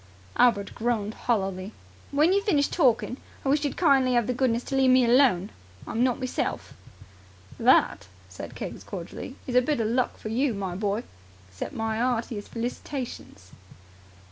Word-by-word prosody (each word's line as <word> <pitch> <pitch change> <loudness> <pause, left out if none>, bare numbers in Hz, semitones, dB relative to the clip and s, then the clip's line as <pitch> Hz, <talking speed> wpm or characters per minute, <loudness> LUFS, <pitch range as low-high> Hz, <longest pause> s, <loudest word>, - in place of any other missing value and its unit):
Albert 210 -5 +3
groaned 220 -3 -1
hollowly. 195 -4 -2 0.4
"When 305 +6 +3
you've 400 +1 +1
finished 295 -9 +2
torkin', 255 -5 +2 0.3
I - - +1
wish 290 +2 +2
you'd 290 - -2
kindly 270 -7 +4
have 240 -2 +3
the 250 - -1
goodness 245 -1 +1
to 270 - -4
leave 265 -1 +4
me 255 -1 +5
alone. 235 -6 +4 0.3
I'm 230 - 0
not 250 -2 +2
meself." 255 -1 -3 0.9
"That," - - +3 0.2
said - - -9
Keggs - - -6
cordially, - - -7
"is 255 - -4
a 250 - +6
bit 290 +1 0
of 220 - +1
luck 245 +3 0
for 215 - -7
you, 245 +1 +1
my 190 -2 -3
boy. 205 +4 -1 0.5
Accept 95 - -6
my 220 0 -2
'eartiest 235 -4 -1
felicitations!" 235 - -6
245 Hz, 160 wpm, -26 LUFS, 220-265 Hz, 0.9 s, a